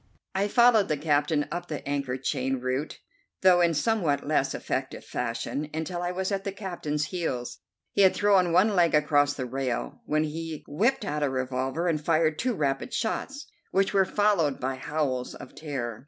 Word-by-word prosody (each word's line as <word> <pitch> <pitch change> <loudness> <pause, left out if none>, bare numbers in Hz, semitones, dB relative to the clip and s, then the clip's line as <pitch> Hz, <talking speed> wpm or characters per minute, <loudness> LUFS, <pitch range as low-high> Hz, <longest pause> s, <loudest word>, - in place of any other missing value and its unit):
I 195 +2 +1
followed 235 -2 +5
the 155 - 0
captain 145 0 +1
up 175 +1 -4
the 150 -3 -6
anchor 140 -3 -1
chain 135 0 -1
route, 130 +4 -3 0.4
though 180 -1 +6
in 170 -2 +3
somewhat 170 -6 +1
less - - +1
effective - - -4
fashion, 125 +5 -3
until 175 +2 -3
I 175 0 -1
was 190 +2 -2
at 195 -1 -1
the 200 - -3
captain's 155 -7 -3
heels. 125 -9 -3 0.3
He - - +2
had 190 -1 +6
thrown 195 -4 +3
one 195 +5 +4
leg 170 -3 +4
across 145 -1 +3
the 130 - -3
rail, 130 -1 -3
when 155 +1 +2
he 160 0 -5
whipped 220 - +1
out 150 +1 -2
a 145 - +2
revolver 130 +5 -2
and 155 -3 0
fired 155 -1 +2
two 250 -2 0
rapid 135 -4 -1
shots, 275 +6 -3 0.2
which 195 +1 +1
were 195 -1 +5
followed 190 -8 +1
by 130 +1 -1
howls 130 -2 -2
of - - -11
terror. 125 -8 -5
155 Hz, 180 wpm, -27 LUFS, 135-185 Hz, 0.4 s, though